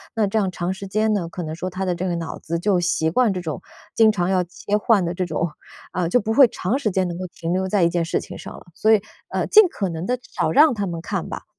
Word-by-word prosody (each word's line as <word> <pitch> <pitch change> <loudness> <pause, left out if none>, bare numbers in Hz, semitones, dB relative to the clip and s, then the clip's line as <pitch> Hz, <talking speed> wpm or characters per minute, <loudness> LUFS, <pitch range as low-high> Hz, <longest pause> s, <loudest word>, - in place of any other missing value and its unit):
那 220 -2 +2
这 205 +2 0
样 195 -3 0
长 180 0 -3
时 195 +1 -8
间 215 +3 +1
呢， 200 -5 0
可 175 +1 -6
能 155 -1 -5
说 180 +3 -4
他 185 +1 -4
的 185 -1 0
这 180 +2 -3
个 175 - -1
脑 165 -1 -5
子 170 +1 -3
就 185 +1 +1
习 160 -2 +1
惯 225 +4 +2
这 180 - -4
种 160 -4 -5 0.3
经 225 -1 +5
常 185 -4 0
要 185 -1 +2
切 200 +4 -2
换 210 -2 +3
的 170 0 -2
这 180 +1 -2
种， 170 -1 -1 0.4
啊， 180 -2 -1
就 245 +9 +2
不 220 +2 -1
会 270 +2 +7
长 225 +4 -2
时 230 - 0
间 190 -1 0
能 170 - -5
够 185 - -4
停 170 -1 -5
留 190 +1 0
在 190 -1 +2
一 170 - +4
件 170 -1 0
事 165 - -1
情 - - -9
上 - - -9
了， - - -15
所 220 +5 +3
以， 215 - +4 0.3
呃， - - -1
尽 430 - +8
可 200 - -3
能 165 +1 -4
地 250 +3 0
少 - - -2
让 295 +1 +6
他 205 -2 -2
们 170 -3 -4
看 - - -3
吧。 - - -7
185 Hz, 310 characters per minute, -22 LUFS, 175-215 Hz, 0.4 s, 尽